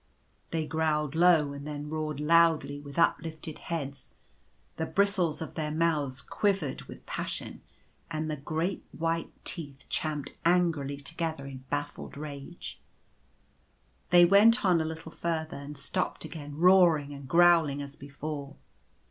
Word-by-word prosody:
They 160 -1 -1
growled 150 -2 0
low 160 -4 +4
and 140 +1 -7
then 150 0 -5
roared 155 -1 -3
loudly 155 -2 +3
with 145 -1 -10
up 165 - +4
lifted 160 -1 -7
heads; 140 -5 -5 0.6
the 160 - -2
bristles 190 -6 +1
of - - -9
their 155 -1 -2
mouths 150 -4 0
quivered 195 -10 0
with - - -12
passion, - - -5 0.5
and 155 -1 -2
the 155 - -2
great 160 +6 -2
white 165 0 -2
teeth 145 -5 -1
champed 150 -3 -2
angrily 165 -5 +2
to 145 +3 -6
gether 160 -5 -2
in 130 -1 -9
baffled 145 -1 -4
rage. 145 +2 -7 1.3
They 175 0 +8
went 210 +5 +6
on 175 -3 +4
a - - -1
little 160 0 -6
further; 160 -2 -3
and 140 +1 -8
stopped 170 +6 -2
again 145 -2 -8
roaring 170 -5 +5
and 140 -1 -9
growling 165 -2 +5
as 140 0 -6
before. 140 0 -6
155 Hz, 140 wpm, -29 LUFS, 145-170 Hz, 1.3 s, They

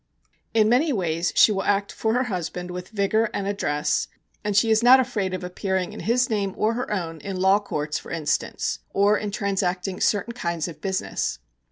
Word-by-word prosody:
In 215 -1 +5
many 260 +7 +3
ways 175 -6 0
she - - +7
will 195 -2 0
act 200 0 0
for 220 +1 -1
her 250 - +2
husband 180 -4 -4
with 180 0 -7
vigour 215 +1 +1
and 200 - -2
address, 150 -7 0 0.4
and 205 -1 0
she 225 +1 +4
is 220 +1 +4
not 250 +2 +8
afraid 220 -7 -1
of 185 -1 -4
appearing 185 0 -2
in - - -8
his 245 +3 +2
name 200 -3 -1
or 220 +2 +2
her 245 0 -4
own 165 -5 -3
in 195 +6 -5
law 190 +2 +4
courts, 150 -7 -3
for - - -12
instance, 155 -3 -1
or 200 +1 +4
in 210 0 -2
transacting 190 -2 -2
certain 210 +3 +1
kinds 170 -8 -2
of 170 - -10
business. 190 - -2
200 Hz, 195 wpm, -24 LUFS, 180-220 Hz, 0.4 s, not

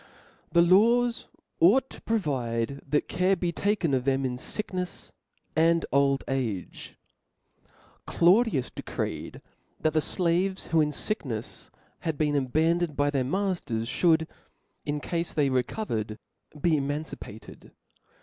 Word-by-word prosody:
The 170 0 +5
laws 230 +7 +4 0.3
ought 240 +10 +5
to - - -11
provide 140 - -1
that 150 +2 +1
care 185 +2 +2
be 175 -1 -1
taken 200 -4 0
of 130 -2 +1
them 135 0 +1
in 125 -1 -2
ficknefs 180 +4 -4 0.4
and 165 +1 +3
old 140 0 +3
age. 115 -9 -4 1.1
Claudius 180 - +3
('')de - - -7
(OXiphi* - - -28
creed, - - -4 0.4
that 155 - +1
the 155 - +3
fiaves, 185 +3 0
who, 165 -1 +4
in 150 - +2
ficknefs, 135 - -3 0.3
had 160 -3 -3
htt^clJ^io. 145 -3 +1
abandoned 160 +2 +1
by 145 0 +2
their 135 -3 +1
matters, 140 - -2
(hould, 160 -2 +4 0.6
in 145 0 -2
cafe 170 +1 -3
they 145 -3 +2
re 130 -1 +3
covered, 110 - -4 0.4
be 165 -1 +3
emancipated. 145 -6 -6
155 Hz, 130 wpm, -27 LUFS, 135-180 Hz, 1.1 s, The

